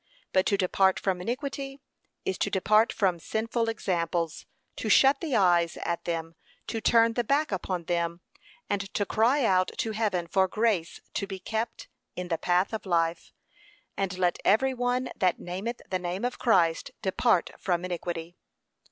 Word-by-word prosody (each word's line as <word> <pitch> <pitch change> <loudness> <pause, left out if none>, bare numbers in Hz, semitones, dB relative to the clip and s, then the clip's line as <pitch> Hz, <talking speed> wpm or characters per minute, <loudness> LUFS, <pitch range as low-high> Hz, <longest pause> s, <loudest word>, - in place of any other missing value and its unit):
But 185 - +3
to 200 - +2
depart 190 0 +2
from 185 -2 -1
iniquity 275 +5 -4 0.5
is 190 - -2
to - - +1
depart 215 +4 +3
from 185 -5 +1
sinful 230 +5 -1
examples, 170 -6 -2 0.3
to 220 - -3
shut 270 +5 +5
the 310 -7 -1
eyes 175 -3 +3
at 170 0 -2
them, 165 -1 -3 0.3
to 225 - -4
turn 230 0 +4
the 240 - 0
back 280 +5 +1
upon 185 -2 -2
them, 170 0 -1 0.5
and 195 -1 -2
to 205 - +1
cry 240 +7 +2
out 185 -3 +3
to 225 - -1
heaven 205 -5 0
for 190 +2 +2
grace 210 -5 0
to 200 - -2
be 195 -1 -5
kept 220 +5 -4 0.3
in 180 -1 -5
the 165 - -1
path 180 +4 +1
of 215 -2 -4
life. 165 -1 0 0.6
And, 190 -2 -2
'Let 180 -1 +1
every 265 +6 +3
one 250 0 -1
that 185 -2 +2
nameth 195 +7 -5
the 185 - -1
name 180 +5 -3
of 250 - -3
Christ 170 -9 +2
depart 190 0 +2
from 180 -1 -1
iniquity.' 175 -1 -4
190 Hz, 165 wpm, -28 LUFS, 175-230 Hz, 0.6 s, shut